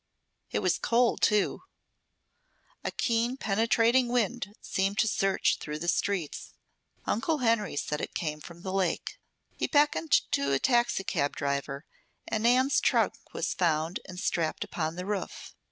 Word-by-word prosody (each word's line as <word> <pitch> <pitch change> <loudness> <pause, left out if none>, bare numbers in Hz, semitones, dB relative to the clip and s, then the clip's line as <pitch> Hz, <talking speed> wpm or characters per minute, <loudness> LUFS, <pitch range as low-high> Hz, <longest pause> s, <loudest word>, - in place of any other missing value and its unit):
It - - -2
was - - +2
cold, 240 +1 +2
too. 210 -2 +2 1.2
A - - -1
keen, 235 +2 0
penetrating 230 +3 +3
wind 240 -3 -1
seemed 195 +1 -1
to 220 - +3
search 195 -2 +1
through 150 0 -5
the 170 +3 -5
streets. 175 -2 -1 0.5
Uncle 300 +8 0
Henry 230 - +1
said 150 +1 -2
it - - -5
came 150 -2 -3
from 170 +2 -12
the 190 - -4
lake. 190 -3 -1 0.4
He - - 0
beckoned 295 +1 +2 0.2
to 140 0 +1
a - - +4
taxicab 195 - +1
driver, 140 0 -2 0.4
and 220 - -1
Nan's 255 +4 +4
trunk - - +3 0.2
was - - -1
found 165 -1 0
and 180 -1 -8
strapped 165 -3 -1
upon 160 -1 -3
the 180 +1 -5
roof. 205 -1 -4
195 Hz, 145 wpm, -29 LUFS, 165-235 Hz, 1.2 s, a